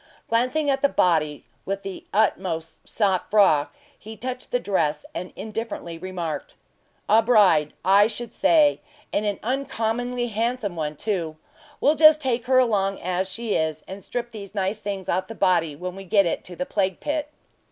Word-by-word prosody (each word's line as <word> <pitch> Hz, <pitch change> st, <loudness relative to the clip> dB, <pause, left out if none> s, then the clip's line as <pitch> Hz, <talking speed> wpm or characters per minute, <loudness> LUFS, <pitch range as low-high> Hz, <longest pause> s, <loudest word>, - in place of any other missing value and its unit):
Glancing 255 Hz, +6 st, +1 dB
at 270 Hz, -1 st, +1 dB
the 280 Hz, -, +4 dB
body 155 Hz, -, +1 dB, 0.2 s
with 195 Hz, 0 st, -4 dB
the 195 Hz, -1 st, -7 dB
utmost 185 Hz, -6 st, -1 dB
sang 195 Hz, -4 st, +2 dB
froid, 190 Hz, -8 st, +4 dB, 0.3 s
he 220 Hz, +1 st, -10 dB
touched 250 Hz, +2 st, -5 dB
the 245 Hz, -, +1 dB
dress, 155 Hz, -9 st, 0 dB
and 180 Hz, -, -5 dB
indifferently 215 Hz, -6 st, -5 dB
remarked: 185 Hz, -, -5 dB, 0.5 s
"A 220 Hz, +1 st, +6 dB
bride, 200 Hz, -10 st, +4 dB
I 200 Hz, +2 st, +6 dB
should 230 Hz, +1 st, -7 dB
say; 305 Hz, -3 st, +4 dB, 0.3 s
and 210 Hz, -, 0 dB
an 205 Hz, -, -1 dB
uncommonly 245 Hz, -1 st, -1 dB
handsome 225 Hz, -2 st, -2 dB
one 155 Hz, -2 st, -3 dB
too. 170 Hz, -4 st, -3 dB, 0.4 s
We'll 295 Hz, -, +4 dB
just 310 Hz, 0 st, +7 dB
take 250 Hz, -4 st, -1 dB
her 260 Hz, 0 st, +4 dB
along 200 Hz, -6 st, +2 dB
as 185 Hz, +1 st, -2 dB
she 230 Hz, +1 st, -3 dB
is, 155 Hz, -1 st, -1 dB
and 195 Hz, +1 st, -8 dB
strip 240 Hz, -1 st, -4 dB
these 210 Hz, -2 st, -9 dB
nice 195 Hz, +2 st, -1 dB
things 195 Hz, -3 st, -5 dB
off 185 Hz, 0 st, 0 dB
the 225 Hz, -, -8 dB
body 175 Hz, -6 st, +2 dB
when 180 Hz, +4 st, -6 dB
we 195 Hz, -, -8 dB
get 200 Hz, +1 st, +3 dB
it 170 Hz, -, -2 dB
to 180 Hz, -, -9 dB
the 180 Hz, -, -3 dB
plague 190 Hz, -2 st, -1 dB
pit." 300 Hz, 0 st, -2 dB
205 Hz, 175 wpm, -24 LUFS, 180-240 Hz, 0.5 s, just